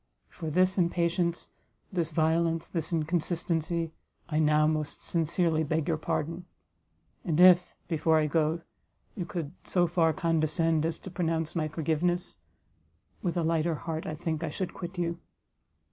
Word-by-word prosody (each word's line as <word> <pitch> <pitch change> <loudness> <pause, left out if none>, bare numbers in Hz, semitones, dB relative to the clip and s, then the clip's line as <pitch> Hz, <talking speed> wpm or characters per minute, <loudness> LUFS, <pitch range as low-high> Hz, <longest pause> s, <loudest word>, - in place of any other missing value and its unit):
For 160 -3 -6
this 185 +4 +2
impatience, 170 0 0 0.4
this 170 -3 0
violence, 165 +1 +1
this 165 0 -3
inconsistency, 165 0 -1 0.4
I 155 -1 +1
now 150 0 +4
most 155 -1 -1
sincerely 165 -1 +1
beg 155 0 -1
your 165 -2 +1
pardon; 165 +3 -2 0.8
and 165 -2 0
if, 180 -1 +6
before 160 -1 +2
I 155 - +3
go, 160 +2 +1 0.5
you 180 - -4
could 165 -6 -4
so 180 -2 +2
far 165 -1 +2
condescend 160 0 +1
as 165 - -3
to 190 - -10
pronounce 165 -3 -1
my 155 -2 0
forgiveness, 165 +3 -1 0.8
with 175 -2 -1
a 170 - +1
lighter 165 0 +1
heart, 160 +1 -4
I 155 - -3
think, 160 +1 -3
I 160 - -1
should 180 +4 -4
quit 180 +1 -7
you." 170 -1 -1
165 Hz, 145 wpm, -29 LUFS, 155-175 Hz, 0.8 s, if